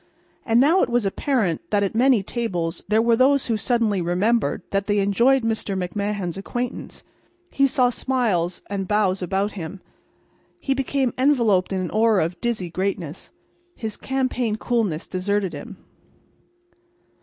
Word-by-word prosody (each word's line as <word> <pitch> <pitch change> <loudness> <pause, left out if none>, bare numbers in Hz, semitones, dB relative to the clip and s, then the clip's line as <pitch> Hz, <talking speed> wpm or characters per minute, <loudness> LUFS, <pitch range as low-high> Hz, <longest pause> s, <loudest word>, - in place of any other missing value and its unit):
And 230 0 +4
now 315 +8 +4
it - - +1
was 240 -2 +1
apparent 195 - -1
that 205 -1 +2
at 195 - -1
many 240 -2 +3
tables 180 -7 -3
there 215 +2 +3
were 235 0 +4
those 270 +3 +3
who 230 - 0
suddenly 220 -3 +1
remembered 200 +7 0
that 195 0 -1
they 205 -1 +1
enjoyed 235 +7 +3
Mr. 220 -3 -1
McMahan's 195 -1 -3
acquaintance. 245 +5 -5 0.5
He 275 0 +3
saw 250 -2 +2
smiles 220 -10 -1
and 195 -2 -3
bows 200 -2 +1
about 195 +3 -1
him. 190 0 -7 0.8
He 270 - 0
became 270 -1 -1
enveloped 235 -10 +3
in 185 -1 -1
the - - -7
aura 215 -5 +3
of 170 +1 -7
dizzy 215 -8 -2
greatness. 185 -3 -3 0.5
His 220 -2 -4
campaign 255 -4 -1
coolness 220 -9 -1
deserted 190 -1 -1
him. 145 - -8
210 Hz, 145 wpm, -23 LUFS, 190-240 Hz, 0.8 s, And